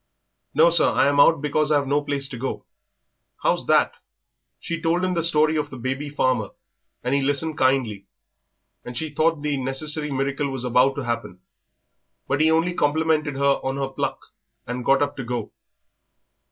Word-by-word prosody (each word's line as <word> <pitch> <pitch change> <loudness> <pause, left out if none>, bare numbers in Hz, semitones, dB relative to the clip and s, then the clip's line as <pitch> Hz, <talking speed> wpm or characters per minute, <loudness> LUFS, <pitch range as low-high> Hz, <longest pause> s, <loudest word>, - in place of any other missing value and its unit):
"No, 165 +3 +6
sir; 170 - +5
I'm 145 +1 +2
out 150 0 +5
because 150 +1 +1
I've 145 -2 +3
no 145 +2 +1
place 140 -1 -2
to 125 - -7
go." 130 - -4 0.8
"How's - - +1
that?" - - +3 0.7
She 170 -1 -5
told 170 +2 +1
him 185 - 0
the 170 - 0
story 155 -1 +3
of 150 - -2
the 130 - -9
baby 135 +4 -3
farmer 130 -7 0 0.5
and 125 +2 -1
he 140 - +2
listened 145 +3 -1
kindly, 125 -7 +1 0.8
and 125 -1 -8
she 160 +1 -3
thought 155 0 +1
the 145 -1 -1
necessary 150 +3 -2
miracle 140 +1 -1
was 135 -2 -3
about 125 +2 +3
to 140 - -4
happen. 115 -6 -4 0.9
But 140 +2 0
he 160 - +4
only 165 +2 +2
complimented 155 -1 +1
her 140 0 +2
on 135 +1 -2
her 135 -1 -2
pluck 135 - -3 0.5
and 125 +1 -4
got 135 +3 +3
up 145 - -3
to 135 - -4
go. 120 -2 -4
140 Hz, 175 wpm, -23 LUFS, 130-155 Hz, 0.9 s, No